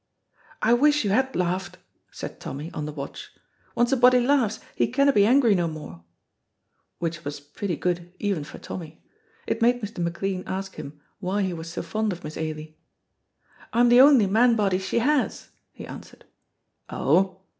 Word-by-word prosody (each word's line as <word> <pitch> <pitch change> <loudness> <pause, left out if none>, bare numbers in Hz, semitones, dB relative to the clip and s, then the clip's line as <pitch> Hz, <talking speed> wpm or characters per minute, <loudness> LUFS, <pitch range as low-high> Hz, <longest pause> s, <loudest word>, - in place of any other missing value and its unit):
"I 230 - +4
wish 295 +4 +4
you 205 - 0
had 265 +5 +1
laughed," 180 0 -2 0.3
said - - -8
Tommy, 150 +5 -6
on 150 -1 -4
the - - -4
watch; 140 -2 -8 0.5
"once 240 +2 +2
a - - +4
body 250 0 +6
laughs 245 -4 +2
he - - +1
canna 275 +4 +3
be 205 -3 +5
angry 245 -3 +5
no 175 -3 +1
more," 150 - -8 0.9
which 165 0 -4
was 145 0 -5
pretty 160 +6 -4
good 175 +1 -2
even 195 -7 -1
for - - -10
Tommy. 160 -3 -9 0.4
It - - -2
made 245 +1 +4
Mr. 210 -1 -6
McLean 185 +2 -2
ask 195 0 -4
him 145 +1 -9 0.2
why 195 +1 -1
he 185 -2 -1
was 165 0 -7
so - - -4
fond 215 +5 -1
of 175 - -11
Miss 155 +1 -7
Ailie. 155 0 -6 0.9
"I'm 240 +1 +4
the 245 +1 +8
only 270 -6 +7
man 230 +5 +4
body 195 -4 +1
she 190 +4 -2
has," 260 -1 0 0.2
he - - -10
answered. - - -11 0.6
"Oh? 185 +6 +1
190 Hz, 175 wpm, -25 LUFS, 165-235 Hz, 0.9 s, the